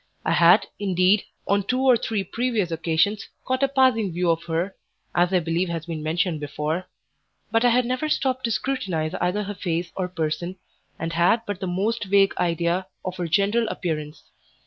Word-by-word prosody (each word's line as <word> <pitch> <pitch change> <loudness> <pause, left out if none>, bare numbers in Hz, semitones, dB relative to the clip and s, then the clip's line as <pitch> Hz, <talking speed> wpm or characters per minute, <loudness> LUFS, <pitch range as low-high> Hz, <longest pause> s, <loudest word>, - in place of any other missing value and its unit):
I - - +1
had, - - +6
indeed, 190 +1 +2 0.2
on 200 +1 +3
two 255 +6 -1
or 260 -2 +6
three 220 -3 -1
previous 225 -2 -1
occasions, 165 +5 0 0.2
caught 260 +1 0
a 275 - +4
passing 260 -7 +3
view 175 0 +1
of 165 +1 -2
her 170 +4 -2 0.4
(as 175 +1 +2
I 185 - +4
believe 170 +2 -1
has 165 -1 -4
been 165 -2 -5
mentioned 160 +1 0
before); 150 +4 -3 0.6
but 225 +1 +3
I 245 - +6
had 245 +1 +3
never 255 +5 -1
stopped 260 -3 0
to 230 - 0
scrutinize 195 -9 -1
either 200 +4 0
her 205 +1 -5
face 170 -2 -3
or 185 -2 -1
person, 175 +1 -3 0.4
and 165 0 -4
had 175 +7 +3
but 205 -2 -4
the 190 - -3
most 205 +5 -1
vague 195 0 +4
idea 170 +2 0 0.2
of 185 0 -4
her 175 -2 -2
general 200 +7 +2
appearance. 155 -6 -4
185 Hz, 185 wpm, -24 LUFS, 170-220 Hz, 0.6 s, had